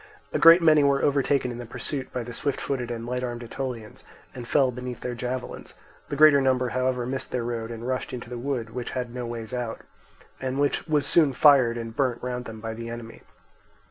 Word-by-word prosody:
A - - +1
great 170 +1 +8
many 155 -2 +6
were 140 -1 +2
overtaken 140 -2 +2
in 120 - -7
the 120 - -6
pursuit 130 +3 -5
by 125 - -3
the 120 +1 -8
swift 140 +3 -2
footed 125 -4 -3
and 115 -1 -4
light 125 +1 -3
armed 120 -1 -4
Aetolians, 120 -2 -6 0.3
and 120 -2 -8
fell 135 -1 +3
beneath 125 0 -7
their 125 - -3
javelins; 125 +1 -5 0.3
the - - -2
greater 150 -1 +7
number 130 -1 +2
however 125 -1 0
missed 130 +1 -4
their 125 -2 -2
road 115 -1 -3
and 115 +1 -6
rushed 130 0 -2
into 125 -1 -6
the 120 0 -6
wood, 120 -3 -3
which 125 0 -5
had 125 -1 -3
no 125 -1 -4
ways 115 -1 -6
out, 120 -2 -3 0.6
and 130 0 -3
which 145 +3 0
was 150 -3 +2
soon 150 -2 +4
fired 130 -5 +5
and 115 -1 -6
burnt 125 -4 0
round 125 0 -3
them 110 -2 -8
by 110 0 -5
the 115 +1 -7
enemy. 115 -1 -8
125 Hz, 215 wpm, -26 LUFS, 120-135 Hz, 0.6 s, great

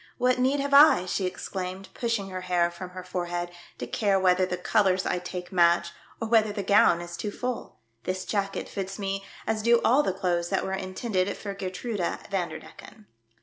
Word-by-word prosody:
What 250 0 +2
need 265 +3 +2
have 280 0 -2
I," 280 - +7
she 185 +1 -1
ex 180 - -6
claimed, 190 0 -5
pushing 230 -5 -2
her 185 0 -4
hair 175 -1 +1
from 180 +1 -8
her 185 0 -8
forehead, 175 -1 -3
" - - -24
to - - -4
care 195 - +1
whether 185 0 +3
the 180 - -2
colours 190 0 +2
I 180 - 0
take 180 0 -7
match, 170 -1 +3 0.3
or 225 - -2
whether 220 -2 +4
the 205 -1 -4
gown 190 -3 +5
is 175 0 -7
too 210 - -3
full. 250 +4 -5 0.3
This 185 +1 -2
jacket 200 -2 -2
fits 195 -1 -5
me 195 -1 -3 0.2
as 220 0 0
do 235 +1 +5
all 265 +5 +5
the 245 - 0
clothes 175 -2 -1
that 195 - 0
were 190 - -3
inten 190 +4 -5
ded 185 +1 +1
for 200 -1 -5
Geertruida 195 0 -3
Vanderdecken." 195 +3 -6
190 Hz, 200 wpm, -27 LUFS, 180-215 Hz, 0.3 s, I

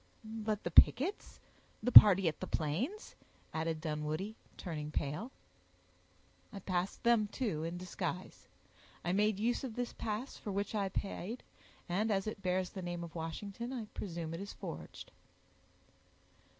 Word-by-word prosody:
"But 220 -1 -3
the 175 - -3
pickets—the 270 - +2
party 195 -5 +11
at 160 - -1
the - - -4
Plains?" 225 - -2 0.4
added 160 0 -1
Dunwoodie, 155 +6 -3 0.2
turning 150 -5 -5
pale. 150 - -3 1.2
"I - - -8
passed 185 -1 -2
them, 235 -3 +4
too, 200 -9 -2
in 165 +2 -3
disguise. 180 0 -5 0.6
I 175 - +1
made 210 +1 +2
use 240 +5 0
of 245 -5 -5
this 245 -1 -3
pass, 220 +5 -4
for 205 - -6
which 200 +2 -2
I 200 -2 0
paid; 200 +4 -4 0.4
and, 200 +6 0
as 195 -2 +1
it 215 -2 -5
bears 185 0 0
the 190 - -6
name 175 -1 -4
of 165 -1 -8
Washington, 200 +8 -5
I 245 -4 -4
presume 170 -4 -5
it 165 - -5
is 200 - -6
forged." - - -8
195 Hz, 145 wpm, -34 LUFS, 170-220 Hz, 1.2 s, party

